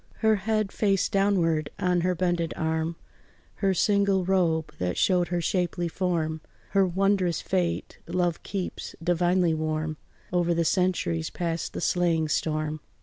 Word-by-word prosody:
Her 220 -1 +5
head, 215 0 0
face 195 -3 +1
downward, 180 -7 +1
on 180 -1 +1
her 180 +1 +1
bended 175 -1 0
arm, 160 +1 -1 0.6
Her 195 -2 +1
single 200 -2 +2
robe 170 -4 +1
that 90 -1 -1
showed 180 -2 +3
her 175 -1 -1
shapely 175 0 0
form, 165 -3 -1 0.3
Her 195 -1 +4
wondrous 185 -2 +1
fate 180 -3 -2
love 175 -1 0
keeps 190 -2 -5
divinely 175 0 +2
warm 155 0 -2 0.4
Over 175 -1 +2
the 165 0 +1
centuries, 160 - +1
past 170 -1 -3
the - - -4
slaying 165 -3 +1
storm. 155 0 -1
175 Hz, 140 wpm, -26 LUFS, 160-190 Hz, 0.6 s, Her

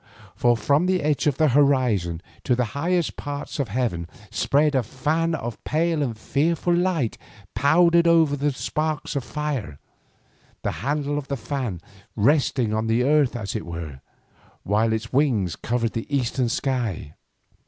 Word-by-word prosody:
For 120 -1 +3
from 145 +9 +2
the 185 -4 +1
edge 150 0 +1
of 140 -2 +1
the 155 -2 +4
horizon 120 - +2 0.2
to 125 - +3
the 125 0 +1
highest 170 +3 0
parts 145 +1 -5
of 140 - 0
heaven 100 -8 -2 0.2
spread 145 +6 +2
a 130 - +3
fan 155 +8 -1
of 120 -6 -6
pale 160 +1 0
and 120 -6 -2
fearful 165 +8 0
light 175 -9 0 0.3
powdered 170 +7 +4
over 165 -3 +4
with 145 -1 -1
sparks 155 -1 -2
of 140 - -1
fire, 135 - -4 0.9
the - - 0
handle 145 +1 -1
of 140 - -9
the 140 - -2
fan 115 - -4 0.3
resting 125 -1 +2
on 110 +1 -1
the 115 +2 +2
earth 145 -2 +3
as 105 -4 -4
it - - -2
were, 80 -5 -7 0.6
while 110 +3 +1
its 110 +1 -3
wings 120 - +2
covered 115 -1 -1
the 115 - -4
eastern 130 -3 0
sky. 115 - -2
135 Hz, 155 wpm, -24 LUFS, 115-150 Hz, 0.9 s, the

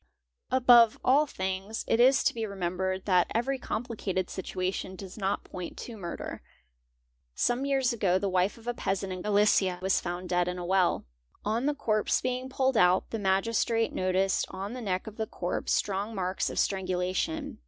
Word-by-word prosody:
Above 240 -3 +6
all 285 +4 +5
things 190 0 -4
it 225 - +2
is 260 +2 +5
to - - +2
be 230 - -4
remembered 190 -1 -2
that 180 -3 +3
every 265 +4 0
complicated 210 -6 -3
situ 190 -1 -6
ation 190 0 -2
does 190 -1 -9
not 200 -1 -1
point 180 -2 -7
to 235 - -7
murder. 175 -5 -6 0.9
Some 245 +3 +1
years 265 -3 +2
ago 190 -5 +2
the 200 +1 -1
wife 185 +2 +1
of 230 - -16
a 240 - -1
peasant 195 -4 -2
in 185 - -6
Galicia 205 -3 +3
was 190 +1 +1
found 175 +1 -4
dead 175 0 +2
in 180 0 -3
a 175 - -5
well. 185 -1 +2 0.4
On 225 +6 0
the 295 - +1
corpse 215 -6 +1
being 255 +1 -3
pulled 265 -2 +1
out, 180 0 +3
the 225 - -2
Magistrate 225 +4 +1
noticed 185 +1 +1
on 195 +4 -5
the 255 - -6
neck 185 -4 -2
of 220 -1 -9
the 220 -1 -2
corpse 175 - -3
strong 205 +3 0
marks 185 -1 -1
of - - -7
strangu 185 -2 0
lation. 265 - -2
200 Hz, 185 wpm, -29 LUFS, 185-235 Hz, 0.9 s, Above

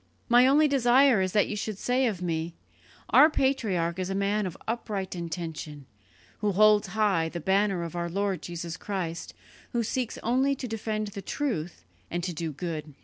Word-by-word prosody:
My 245 +1 +6
only 300 +3 +5
desire 260 -3 +4
is 185 0 0
that 210 - +3
you - - -4
should 210 0 -4
say 250 +4 +1
of 190 -5 -3
me, 165 -1 -2 0.6
'Our 305 - +8
patriarch 200 - 0
is 185 0 -2
a 195 - -2
man 200 +1 0
of 175 - -7
upright 210 -5 -3
intention, 160 -4 -6 0.5
who 205 -1 0
holds 210 +1 +5
high 190 -7 +2
the 170 - -5
banner 190 +1 +1
of 170 0 -6
our 170 0 -2
Lord 195 +1 -1
Jesus 170 0 -6
Christ, 180 -5 -4 0.4
who 235 -1 +1
seeks 245 +1 -2
only 260 +4 +2
to 255 - -6
defend 215 -1 -3
the 200 0 -7
truth 175 - -3 0.2
and 175 0 -3
to 180 0 -2
do 160 0 -3
good.' 155 -2 -6
195 Hz, 180 wpm, -27 LUFS, 170-230 Hz, 0.6 s, Our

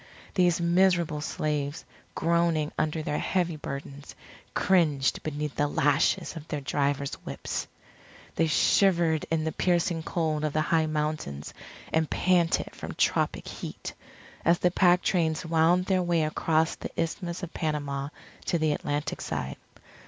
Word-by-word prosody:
These 180 -2 +3
miserable 170 -3 +2
slaves, 150 -1 -2 0.3
groaning 165 -2 +1
under 155 0 -1
their 150 - -1
heavy 175 -3 0
burdens, 140 -1 -7 0.4
cringed 155 -8 +2
beneath 150 -1 -3
the 145 - +2
lashes 145 +2 +1
of 160 -1 -8
their 150 - -3
drivers' 140 0 -1
whips. - - -4 0.7
They 165 - +2
shivered 170 -1 +3
in 160 -1 +1
the 160 - -1
piercing 170 -1 +1
cold 160 -2 -1
of 155 -2 -1
the 155 - +2
high 160 0 +2
mountains, 150 - -3 0.4
and 160 -1 +2
panted 175 -2 +2
from - - -7
tropic - - +1
heat, - - -7 0.5
as 170 +1 +4
the 180 - +2
pack 180 -1 +4
trains 160 -2 +1
wound 165 +2 +3
their 185 -1 +2
way 170 -2 +2
across 160 +1 +1
the - - -6
Isthmus 170 +2 -2
of 175 - -6
Panama 145 -3 -2 0.4
to 170 - +1
the 155 -1 +1
Atlantic 145 0 -3
side. 65 - -4
160 Hz, 140 wpm, -28 LUFS, 150-170 Hz, 0.7 s, as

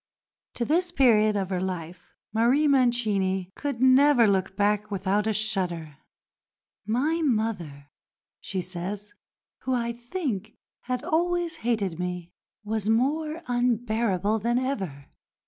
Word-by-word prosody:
To 235 - -1
this 345 +5 +1
period 215 -8 +4
of 195 -2 -2
her 180 -1 -1
life 180 -2 -6 0.2
Marie 245 +7 +3
Mancini 210 -8 +1
could 275 -4 -3
never 260 -1 +6
look 190 -2 +1
back 210 +1 +1
without 200 +1 0
a - - +2
shudder. 180 -8 -2 0.9
"My 290 +9 +1
mother," 200 - -2 0.5
she 190 -1 -3
says, 190 +4 -6 0.5
"who, 260 - -1
I 235 -1 -1
think, 240 - -4 0.3
had 250 0 -2
always 345 +1 0
hated 205 -8 -1
me, 180 -1 -4 0.3
was 215 0 -2
more 300 +7 0
unbearable 225 -4 +1
than 235 +3 0
ever. 195 - -3
220 Hz, 120 wpm, -26 LUFS, 190-255 Hz, 0.9 s, never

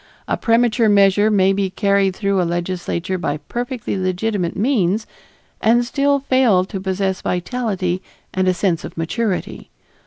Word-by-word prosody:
A - - +1
premature 230 -1 +2
measure 205 +1 +4
may 195 -2 +3
be 195 -1 0
carried 200 -1 +1
through 200 -2 0
a - - +2
legislature 175 +1 -2
by 150 -4 -2
perfectly 240 - -4
legitimate 185 0 -1
means 215 -3 +1 0.6
and 240 +2 +3
still 280 +2 +1
fail 255 -9 +3
to 195 0 -6
possess 190 0 -1
vitality 185 -2 -2 0.3
and 185 0 0
a 185 - +4
sense 175 -2 0
of - - -9
maturity. 190 +5 -3
195 Hz, 145 wpm, -19 LUFS, 185-225 Hz, 0.6 s, measure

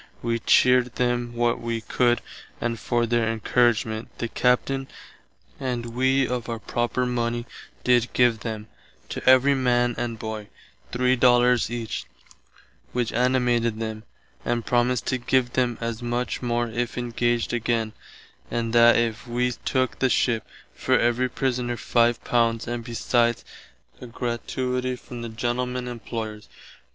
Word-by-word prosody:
Wee 115 0 0
cheared 125 +1 +4
them 120 -1 -1
what 120 0 +1
wee 115 -1 -2
could, 120 +2 +1 0.4
and, 115 -1 -2
for 120 -1 0
their 115 -1 +1
encouragement, 115 -1 +1
the 120 - -2
Captain 130 +3 +1 0.7
and 120 -3 -3
wee 130 +1 +2
of 125 -1 -3
our 115 - -2
proper 120 +2 -1
money 120 -1 -1 0.4
did 125 -1 +3
give 120 -3 +3
them, 110 -1 -5 0.4
to - - -5
every 130 +2 +6
man 120 -2 +2
and 115 -2 -3
boy, 110 -1 -5 0.4
three 125 +1 +2
dollars 120 -1 +4
each, 115 -2 -4 0.9
which 120 -2 -1
animated 120 -2 +1
them, 110 -1 -4 0.4
and 120 -1 -1
promised 125 0 +1
to 130 - 0
give 125 0 +1
them 125 -3 +1
as 115 0 -4
much 120 0 -2
more 120 -1 0
if 120 +2 -3
engaged 120 -1 0
againe, 115 -2 0 0.6
and 115 -1 -2
that 120 0 +7
if 120 +2 -1
[wee] 125 +1 0
took 130 -1 0
the 130 - +3
ship, 115 -2 +1 0.3
for - - +1
every 120 +2 +1
prisoner 125 -2 -1
five 120 0 +2
pounds 115 -2 +1
and 120 0 -3
besides 120 0 0 0.6
a 125 - -7
gratuity 125 +2 -2
from 120 -1 -9
the 115 - -5
Gentlemen 125 +2 -2
Employers. 110 -3 -6
120 Hz, 140 wpm, -24 LUFS, 115-125 Hz, 0.9 s, that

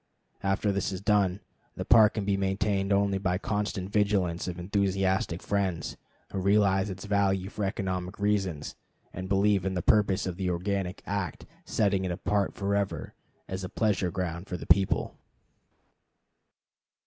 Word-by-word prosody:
After 100 +1 +1
this 100 0 -1
is 95 - -4
done, 100 -1 +2 0.3
the - - -4
Park 110 -2 +6
can 105 -3 -2
be 100 0 +2
maintained 95 0 0
only 100 -1 +2
by 95 -2 0
the - - -2
constant 100 -2 -2
vigilance 100 -5 +1
of 90 -1 -4
enthusiastic 95 -1 0
friends, 95 -4 -1 0.4
who 95 - -2
realize 100 0 +3
its 95 +1 -6
value 100 -2 +1
for 105 - -4
economic 95 -1 -3
reasons, 95 -7 -1 0.4
and 95 +1 -6
believe 100 0 +3
in 95 0 -1
the 90 - -1
purposes 100 -3 +3
of 90 -2 -4
the 95 -1 -1
organic 90 +1 -2
act 100 -5 -3 0.2
setting 100 -3 +1
it 95 - -1
apart 100 +3 0
forever 100 0 -1 0.3
as 95 0 -4
a 90 - -4
pleasure 105 -5 +1
ground 90 0 -4
for 90 - -4
the - - -8
people. 95 +3 +3
95 Hz, 155 wpm, -28 LUFS, 95-100 Hz, 0.4 s, Park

